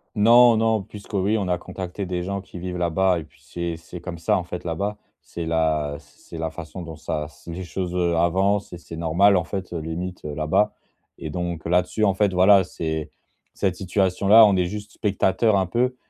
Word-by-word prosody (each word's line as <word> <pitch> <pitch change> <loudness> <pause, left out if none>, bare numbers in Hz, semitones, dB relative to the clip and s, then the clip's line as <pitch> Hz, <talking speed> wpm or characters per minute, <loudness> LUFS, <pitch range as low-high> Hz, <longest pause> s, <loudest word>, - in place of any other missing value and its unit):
Non, 115 +2 +7
non, 110 -1 +2
puisque 105 +1 -12
oui, 100 +3 +1
on 95 -3 -2
a 90 - +1
contacté 90 +2 -6
des 90 -1 -3
gens 100 +2 -3
qui 95 -1 -11
vivent 90 0 -5
là-bas 90 +1 +2
et 80 - -8
puis, 75 0 -26
c'est 85 +4 -4
c'est 85 +2 -10
comme 90 0 -7
ça, 85 - +1
en 90 - -4
fait, 90 0 -6
là-bas. 100 +5 -3 0.2
C'est 85 - -6
la 80 -3 0
c - - -22 0.2
c'est 85 - -7
la 80 0 -2
façon 85 +2 -8
dont 80 -1 -8
ça 75 -1 -4
c 80 +2 -12
les 90 +3 -5
choses, 90 0 -4
heu, 85 -2 +1
avancent 95 +4 +1
et 90 - -7
c'est 85 -1 -10
normal, 85 +5 +3
en 90 - +2
fait, 95 -1 -5
limite, 85 +2 -5
heu, 75 - -5
là-bas. 75 +8 +1 0.4
Et 80 - -6
donc 85 0 -4
là-dessus, 90 +5 +1
en 100 - +3
fait, 100 0 +1
voilà, 95 +2 +6
c'est 80 -3 -4 0.4
cette 95 -3 -1
situation-là, 95 +3 +4
on 100 -2 +4
est 90 -1 +2
juste 105 +2 -7
spectateurs 100 +1 +1
un 95 - +2
peu 125 +7 0
90 Hz, 210 wpm, -23 LUFS, 85-100 Hz, 0.4 s, Non